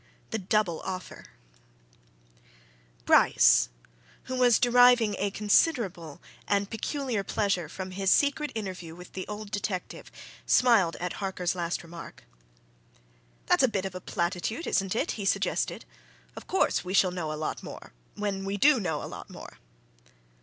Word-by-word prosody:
THE 225 - -1
DOUBLE 195 -3 0
OFFER 185 -2 -7 1.8
Bryce, - - +5 0.5
who 260 - -5
was 245 -3 +5
deriving 245 -3 +5
a 200 - 0
considerable 200 - 0 0.2
and 200 0 +1
peculiar 240 -1 -2
pleasure 195 -6 -1
from 185 +2 -7
his 195 +1 -1
secret 290 +1 +2
interview 185 -6 -6
with 180 +1 -13
the 185 - -5
old 210 0 -7
detective, 200 -3 -4 0.4
smiled 220 -9 +4
at 180 0 -4
Harker's 185 -3 -1
last 175 -1 -3
remark. 170 0 -11 1.2
"That's - - +3
a 260 - +5
bit 200 -5 -2
of 190 - -4
a 185 - -7
platitude, 180 - -2
isn't 195 0 0
it?" - - 0
he 210 - -5
suggested. 195 - -1 0.5
"Of - - -10
course - - +1
we 185 +1 -3
shall 185 -2 +4
know 170 -4 -4
a 155 - -4
lot 155 - -4
more - - -10 0.2
when 200 -2 -3
we 195 +1 -3
do 280 +4 +5
know 160 -7 -2
a - - -7
lot - - -9
more!" - - -11
195 Hz, 145 wpm, -28 LUFS, 180-220 Hz, 1.8 s, Bryce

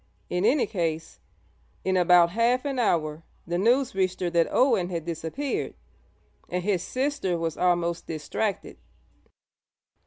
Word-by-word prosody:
In 180 +2 0
any 255 +4 +3
case, 165 -5 -3 0.7
in 190 0 +1
about 175 -1 +5
half 235 +6 +1
an 275 -3 -2
hour 155 -8 0 0.2
the 175 +1 -2
news 245 +6 +2
reached 185 -1 0
her 175 -1 0
that 170 -1 +3
Owen 230 -9 +2
had 170 -3 -4
disappeared, 170 - -3 0.7
and 180 0 -2
his 190 -3 +1
sister 260 -7 -1
was 165 -2 -2
almost 175 -1 0
distracted. 175 +6 -3
180 Hz, 130 wpm, -26 LUFS, 170-230 Hz, 0.7 s, about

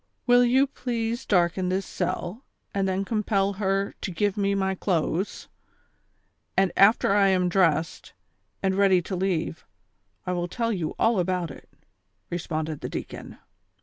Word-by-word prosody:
" - - -48
Will 245 0 +6
you 260 +3 +4
please 240 -2 -3
darken 180 -1 +2
this 190 +1 -1
cell, 190 +9 -3 0.3
and 195 -1 0
then 190 +1 -1
compel 200 -2 0
her 195 0 0
to - - -3
give 200 +3 0
me 200 -1 +1
my 190 -1 0
clothes 180 0 -1
V - - -24 1.1
and 190 -1 +3
after 200 0 +5
I 200 -1 +4
am 185 -2 +2
dressed, 165 -3 +1 0.5
andTeady 190 -2 +3
to 190 - -3
leave, 175 -3 -1 0.6
I 180 - -2
will 175 0 -1
tell 230 +5 -1
you 170 -6 -3
all 225 -3 +3
about 180 -3 -1
it," - - -13 0.6
responded 160 -3 -3
the - - -4
deacon. - - -7
190 Hz, 150 wpm, -26 LUFS, 180-205 Hz, 1.1 s, Will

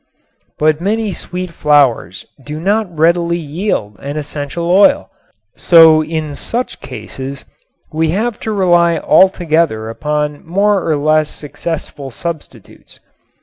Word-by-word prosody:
But 155 +1 +1
many 215 +2 -1
sweet 180 0 -6
flowers 140 - +1 0.2
do 150 +2 -6
not 205 +4 0
readily 170 +1 +2
yield 150 - -3
an 140 +5 -6
essential 150 +3 -5
oil, 205 +11 +3 0.4
so 160 -2 +6
in 155 -2 -4
such 245 - -3
oases 135 +1 -8 0.5
we 160 +1 0
have 215 +6 -1
to 220 - -4
rely 175 -4 +3
altogether 160 - +2
upon 150 +3 -3
more 195 +2 +1
or 155 - +2
less 155 +1 +2
successful 150 -2 -6
substitutes. 165 +4 -9
160 Hz, 115 wpm, -15 LUFS, 150-180 Hz, 0.5 s, so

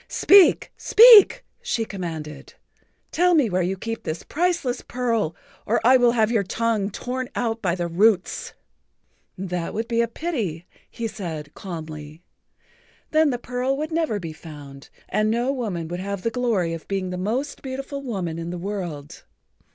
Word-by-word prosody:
"Speak! 390 -2 +5
Speak!" 470 +1 +7 0.2
she 225 - -1
commanded. 160 -8 -7 0.6
"Tell 355 +1 +3
me 265 -10 +3
where 185 +1 +1
you 185 +2 -1
keep 225 +3 -5
this 155 +1 -5
priceless 335 -6 -1
pearl 230 -9 -1 0.3
or 230 - +2
I 260 +2 +7
will 240 -1 +4
have 220 -2 +2
your 225 -3 +2
tongue 215 0 -1
torn 255 +4 -4
out 230 -1 -1
by 175 -3 0
the 175 -1 -2
roots." 190 +2 +1 0.8
"That 180 -2 -4
would 225 +2 -2
be 235 0 +1
a 235 - +1
pity," 225 - -4 0.2
he 230 - -4
said 160 -8 -7
calmly. 155 -3 -8 0.9
"Then 315 -1 +4
the 250 - -1
pearl 250 +2 -2
would 310 +3 -4
never 315 -10 0
be 165 -4 -6
found, 145 -4 -12 0.2
and 215 0 +1
no 240 +4 +1
woman 205 -11 -3
would 175 +1 -4
have 200 0 -4
the 230 - 0
glory 225 -9 0
of 165 - -8
being 190 -2 -2
the - - -3
most 245 +9 -2
beautiful 270 +1 -5
woman 185 -11 -4
in 165 0 -5
the 175 - -4
world." 175 -6 -6
215 Hz, 165 wpm, -23 LUFS, 175-250 Hz, 0.9 s, Speak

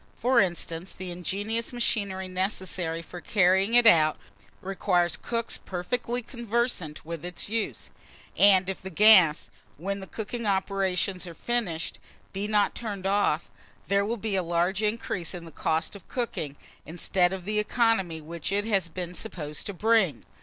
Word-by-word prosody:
For 245 +1 +3
instance, 175 -1 -1
the 185 -1 -5
ingenious 205 +6 -2
machinery 200 -6 -1
necessary 185 -3 -2
for 175 +2 -9
carrying 190 +2 +3
it 240 -1 +6
out, 155 -8 +6 0.4
requires 180 -3 +1
cooks 230 -1 -3
perfectly 240 +7 -3
conversant 235 - -2
with 165 -1 -6
its 180 +2 -4
use; 225 0 -3 0.4
and 195 -2 +6
if 190 - -3
the 190 - -6
gas, 185 -4 +6 0.3
when 195 +5 -3
the 190 - -8
cooking 225 +1 -4
operations 190 -1 0
are 170 - -9
finished, 200 -9 -2 0.3
be 200 +2 -2
not 210 -1 +2
turned 205 -5 -5
off, 195 -5 +1 0.4
there 200 0 +3
will 230 +4 -2
be 215 -1 -1
a 190 - +3
large 175 +3 0
increase 210 -4 -2
in 170 -1 -8
the 165 - -11
cost 160 +5 -1
of 200 - -13
cooking, 160 - -3 0.3
instead 175 +3 +1
of 190 -2 -5
the 210 +1 0
economy 210 -6 +1
which 165 +3 -5
it 205 +1 +1
has 195 -6 +1
been 180 +1 -4
supposed 155 -7 -4
to 200 - -4
bring. 210 - +2
190 Hz, 155 wpm, -27 LUFS, 175-215 Hz, 0.4 s, it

